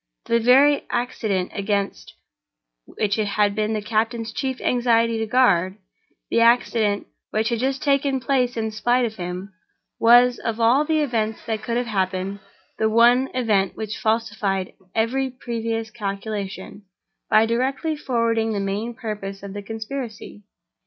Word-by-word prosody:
The 235 Hz, -, +2 dB
very 270 Hz, +5 st, +4 dB
accident 220 Hz, -6 st, -1 dB
against 200 Hz, 0 st, -2 dB, 0.7 s
which 210 Hz, 0 st, -2 dB
it 215 Hz, -, 0 dB
had 205 Hz, 0 st, +2 dB
been 215 Hz, +1 st, -1 dB
the 215 Hz, -1 st, -2 dB
captain's 225 Hz, +1 st, -1 dB
chief 260 Hz, +1 st, -3 dB
anxiety 230 Hz, -2 st, +2 dB
to 220 Hz, -, -2 dB
guard—the 205 Hz, -, 0 dB
accident 230 Hz, -3 st, +3 dB, 0.2 s
which 220 Hz, +1 st, 0 dB
had 235 Hz, -, -1 dB
just 265 Hz, +2 st, -1 dB
taken 275 Hz, -1 st, +2 dB
place 250 Hz, -2 st, 0 dB
in 220 Hz, -1 st, -1 dB
spite 240 Hz, +3 st, +1 dB
of 220 Hz, -1 st, -5 dB
him—was, 200 Hz, +7 st, +1 dB
of 230 Hz, 0 st, -3 dB
all 245 Hz, +6 st, +4 dB
the 310 Hz, 0 st, +1 dB
events 225 Hz, -6 st, -2 dB
that 220 Hz, -2 st, -2 dB
could 235 Hz, +1 st, -2 dB
have 245 Hz, -, 0 dB
happened, 190 Hz, -2 st, -2 dB, 0.4 s
the 220 Hz, -, +2 dB
one 240 Hz, +4 st, +4 dB
event 210 Hz, -6 st, +1 dB
which 215 Hz, -1 st, -5 dB
falsified 205 Hz, -4 st, -1 dB, 0.2 s
every 260 Hz, +4 st, +1 dB
previous 230 Hz, -3 st, -4 dB
calculation, 205 Hz, -1 st, -5 dB, 0.4 s
by 215 Hz, +1 st, +5 dB
directly 265 Hz, +7 st, -1 dB
forwarding 230 Hz, -5 st, 0 dB
the 205 Hz, -, -1 dB
main 205 Hz, +4 st, -3 dB
purpose 205 Hz, -4 st, -6 dB
of 200 Hz, -1 st, -7 dB
the 205 Hz, -, -5 dB
conspiracy! 225 Hz, +1 st, -7 dB
225 Hz, 140 wpm, -23 LUFS, 205-245 Hz, 0.7 s, by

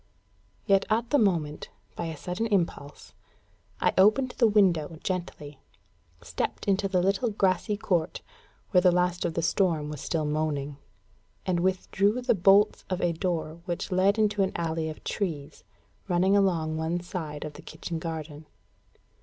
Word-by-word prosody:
Yet 195 Hz, -2 st, +3 dB
at 230 Hz, +2 st, 0 dB
the 290 Hz, -, +4 dB
moment, 165 Hz, -8 st, 0 dB, 0.3 s
by 170 Hz, -, -4 dB
a 160 Hz, -2 st, -6 dB
sudden 180 Hz, +9 st, -3 dB
impulse, 170 Hz, -8 st, -2 dB, 0.7 s
I -, -, +2 dB
opened 230 Hz, +7 st, +4 dB
the 235 Hz, -, +6 dB
window 175 Hz, -7 st, +2 dB
gently, 170 Hz, -6 st, -4 dB, 0.6 s
stepped -, -, -4 dB
into 195 Hz, 0 st, +2 dB
the 185 Hz, -2 st, +1 dB
little 200 Hz, +6 st, +1 dB
grassy 205 Hz, 0 st, 0 dB
court, 175 Hz, -6 st, -1 dB, 0.5 s
where 180 Hz, -4 st, +5 dB
the 180 Hz, 0 st, +5 dB
last 180 Hz, 0 st, +1 dB
of 165 Hz, -2 st, -2 dB
the 165 Hz, -, -1 dB
storm 165 Hz, -4 st, +1 dB
was 150 Hz, -2 st, -6 dB
still 160 Hz, -2 st, -1 dB
moaning, 150 Hz, -2 st, -2 dB, 0.7 s
and 180 Hz, -2 st, +1 dB
withdrew 190 Hz, +4 st, +1 dB
the 245 Hz, -1 st, +3 dB
bolts 195 Hz, +1 st, +4 dB
of 185 Hz, -1 st, -1 dB
a 175 Hz, -2 st, +1 dB
door 165 Hz, -1 st, -3 dB
which 175 Hz, 0 st, -4 dB
led 190 Hz, +3 st, +3 dB
into 210 Hz, -2 st, +2 dB
an 190 Hz, -, +1 dB
alley 160 Hz, -1 st, -2 dB
of 155 Hz, -, -9 dB
trees 155 Hz, -7 st, -4 dB, 0.4 s
running 185 Hz, +2 st, +3 dB
along 165 Hz, -6 st, +1 dB
one 165 Hz, +2 st, -1 dB
side 160 Hz, -5 st, -6 dB
of 150 Hz, -, -7 dB
the -, -, -11 dB
kitchen 165 Hz, -2 st, -6 dB
garden. 155 Hz, -2 st, -6 dB
175 Hz, 155 wpm, -27 LUFS, 160-195 Hz, 0.7 s, the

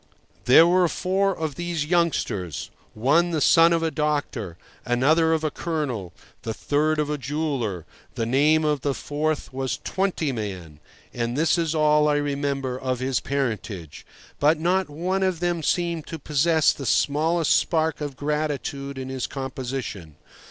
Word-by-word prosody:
There 130 Hz, +6 st, +8 dB
were 180 Hz, +1 st, +4 dB
four 190 Hz, +3 st, 0 dB
of 160 Hz, -2 st, -3 dB
these 170 Hz, 0 st, -3 dB
youngsters: 150 Hz, -, -1 dB, 0.2 s
one 145 Hz, +10 st, +3 dB
the 165 Hz, -2 st, -1 dB
son 165 Hz, +3 st, +6 dB
of 165 Hz, -1 st, +1 dB
a 165 Hz, -, 0 dB
doctor, 145 Hz, -, -2 dB, 0.3 s
another 150 Hz, +7 st, +3 dB
of 160 Hz, -1 st, +1 dB
a 155 Hz, -, 0 dB
colonel, 135 Hz, -, -3 dB, 0.3 s
the 110 Hz, -1 st, -4 dB
third 155 Hz, +2 st, +1 dB
of 150 Hz, -1 st, 0 dB
a 150 Hz, -, -2 dB
jeweller; 135 Hz, -, -2 dB, 0.3 s
the 115 Hz, -, -1 dB
name 150 Hz, +6 st, +3 dB
of 150 Hz, -2 st, +1 dB
the 140 Hz, -2 st, -1 dB
fourth 150 Hz, -1 st, -2 dB
was 130 Hz, 0 st, -2 dB
Twentyman, 110 Hz, -, -3 dB, 0.3 s
and 120 Hz, +1 st, -2 dB
this 160 Hz, +2 st, +3 dB
is 165 Hz, -2 st, -1 dB
all 150 Hz, -1 st, +4 dB
I 150 Hz, -, +2 dB
remember 140 Hz, -3 st, -2 dB
of 130 Hz, -1 st, -2 dB
his 130 Hz, -1 st, 0 dB
parentage. 110 Hz, -, -4 dB, 0.4 s
But 150 Hz, +2 st, +3 dB
not 180 Hz, +1 st, +1 dB
one 180 Hz, +6 st, -2 dB
of 185 Hz, -3 st, 0 dB
them 175 Hz, -1 st, -1 dB
seemed 170 Hz, 0 st, -1 dB
to 165 Hz, -, -5 dB
possess 155 Hz, +2 st, +2 dB
the 140 Hz, -, -6 dB
smallest 160 Hz, +3 st, +2 dB
spark 160 Hz, -2 st, +1 dB
of 145 Hz, -3 st, -5 dB
gratitude 145 Hz, -2 st, -3 dB
in 130 Hz, 0 st, -5 dB
his 130 Hz, -1 st, -3 dB
composition. 130 Hz, -, -5 dB
150 Hz, 155 wpm, -24 LUFS, 130-160 Hz, 0.4 s, There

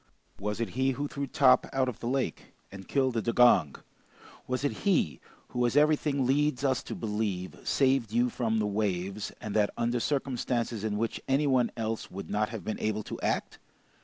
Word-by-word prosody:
Was 105 Hz, +2 st, -3 dB
it 115 Hz, -, -1 dB
he 130 Hz, +1 st, +1 dB
who 145 Hz, +3 st, -3 dB
threw 140 Hz, -1 st, -4 dB
Top 130 Hz, -3 st, +4 dB
out 130 Hz, -1 st, +1 dB
of 125 Hz, -, -4 dB
the 120 Hz, -, -4 dB
lake, 130 Hz, +1 st, -2 dB, 0.2 s
and 100 Hz, -1 st, -10 dB
killed 130 Hz, -2 st, +1 dB
the 115 Hz, -, 0 dB
dugong? 115 Hz, -, +4 dB, 0.7 s
Was 130 Hz, +1 st, -2 dB
it 145 Hz, -, +1 dB
he, 180 Hz, -, +1 dB, 0.3 s
who 125 Hz, -, -1 dB
as 120 Hz, -, 0 dB
everything 150 Hz, -2 st, +3 dB
leads 140 Hz, 0 st, +1 dB
us 130 Hz, -3 st, +2 dB
to -, -, -6 dB
believe, 105 Hz, -4 st, -3 dB
saved 130 Hz, -5 st, +2 dB
you 120 Hz, +2 st, +2 dB
from 110 Hz, -2 st, 0 dB
the 110 Hz, -, +1 dB
waves, 100 Hz, -1 st, -2 dB
and 105 Hz, -1 st, -5 dB
that 105 Hz, -1 st, +3 dB
under 120 Hz, +1 st, 0 dB
circumstances 125 Hz, -5 st, -1 dB
in 105 Hz, -1 st, -1 dB
which 115 Hz, +1 st, -2 dB
any 135 Hz, +3 st, +2 dB
one 130 Hz, -4 st, +3 dB
else 115 Hz, 0 st, -3 dB
would 100 Hz, +2 st, -7 dB
not 105 Hz, +1 st, +1 dB
have 110 Hz, -5 st, -6 dB
been 110 Hz, -, -3 dB
able 110 Hz, 0 st, -1 dB
to -, -, -7 dB
act? -, -, -1 dB
120 Hz, 190 wpm, -29 LUFS, 105-135 Hz, 0.7 s, Top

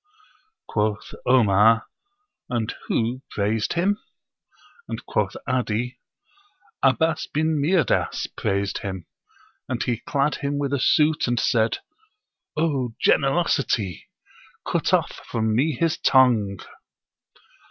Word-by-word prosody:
Quoth 105 Hz, -1 st, -2 dB
Omar, 115 Hz, -2 st, +5 dB, 0.6 s
"And 115 Hz, -3 st, -1 dB
who 120 Hz, +3 st, 0 dB
praised 105 Hz, +2 st, -1 dB
him?" 195 Hz, +5 st, +1 dB, 0.9 s
And -, -, -6 dB
quoth -, -, -1 dB
'Adi, 125 Hz, 0 st, -1 dB, 0.8 s
"Abbás 160 Hz, +4 st, +2 dB
bin 155 Hz, 0 st, +1 dB
Mirdás 170 Hz, +3 st, +1 dB
praised 100 Hz, -1 st, -1 dB
him, 95 Hz, -3 st, -6 dB, 0.6 s
and -, -, -1 dB
he 120 Hz, -2 st, -1 dB
clad 140 Hz, +1 st, 0 dB
him 145 Hz, 0 st, -2 dB
with 140 Hz, -1 st, -1 dB
a 140 Hz, -, +1 dB
suit 150 Hz, +3 st, +3 dB
and 120 Hz, -1 st, +1 dB
said, 115 Hz, -1 st, +2 dB, 0.8 s
'O 135 Hz, -7 st, 0 dB
Generosity! 135 Hz, -, +1 dB, 0.6 s
Cut -, -, 0 dB
off -, -, +1 dB
from 110 Hz, -1 st, 0 dB
me 150 Hz, +6 st, +2 dB
his 160 Hz, +5 st, 0 dB
tongue!'" 115 Hz, -7 st, +4 dB
125 Hz, 105 wpm, -23 LUFS, 110-145 Hz, 0.9 s, Omar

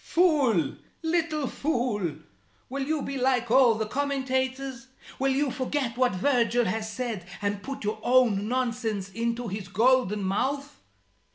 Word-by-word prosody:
"Fool 280 Hz, -, +2 dB, 0.3 s
little 320 Hz, -3 st, 0 dB
fool! 240 Hz, -, -1 dB, 0.5 s
Will 275 Hz, +2 st, -3 dB
you 295 Hz, +2 st, -1 dB
be 275 Hz, -1 st, -4 dB
like 250 Hz, -2 st, +1 dB
all 250 Hz, -3 st, +6 dB
the 220 Hz, 0 st, -1 dB
commentators? 265 Hz, 0 st, -2 dB, 0.3 s
Will 270 Hz, 0 st, +2 dB
you 275 Hz, 0 st, +1 dB
forget 260 Hz, -1 st, -2 dB
what 250 Hz, -4 st, +2 dB
Virgil 240 Hz, +1 st, +2 dB
has 220 Hz, 0 st, -2 dB
said 230 Hz, -5 st, -3 dB, 0.2 s
and 200 Hz, 0 st, -2 dB
put 275 Hz, 0 st, -6 dB
your 215 Hz, +1 st, -2 dB
own 235 Hz, -5 st, +3 dB
nonsense 230 Hz, -5 st, -1 dB
into 235 Hz, +2 st, -2 dB
his 200 Hz, -1 st, -5 dB
golden 225 Hz, -2 st, +2 dB
mouth?" 275 Hz, +9 st, -1 dB
250 Hz, 140 wpm, -27 LUFS, 220-270 Hz, 0.5 s, all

